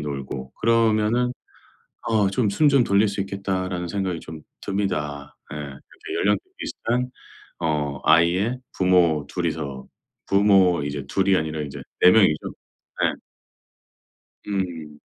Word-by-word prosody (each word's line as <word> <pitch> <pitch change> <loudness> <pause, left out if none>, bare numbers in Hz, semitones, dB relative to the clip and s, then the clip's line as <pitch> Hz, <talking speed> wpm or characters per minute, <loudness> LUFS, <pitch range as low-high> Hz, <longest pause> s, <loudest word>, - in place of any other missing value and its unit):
놀고 70 -2 -5
그러면은 115 +1 +2 0.8
어 110 -3 +3
'좀 105 -1 +1
숨 145 +9 +3
좀 135 -3 +4
돌릴 100 +1 +3
수 100 0 -2
있겠다.'라는 95 -2 -3
생각이 95 -2 -2
좀 80 -1 -10 0.2
듭니다. 75 -8 -3 0.2
예. - - -6
그렇게 70 -2 -8
연령대 105 0 +2 0.2
비슷한 125 +2 -2 0.5
어 75 -4 -1
아이의 90 +9 +3 0.2
부모 85 -5 +3
2 90 -1 -3
이서 75 -5 -4 0.4
부모 95 -4 +4
이제 70 -1 -4
2 95 +4 0
이 95 -1 +5
아니라 80 0 -2
인제 70 -2 -7 0.2
4 90 - +9
명이죠. 95 -8 +3 0.6
예. - - -2 1.3
음. 85 -7 -4
90 Hz, 230 characters per minute, -23 LUFS, 75-100 Hz, 1.3 s, 4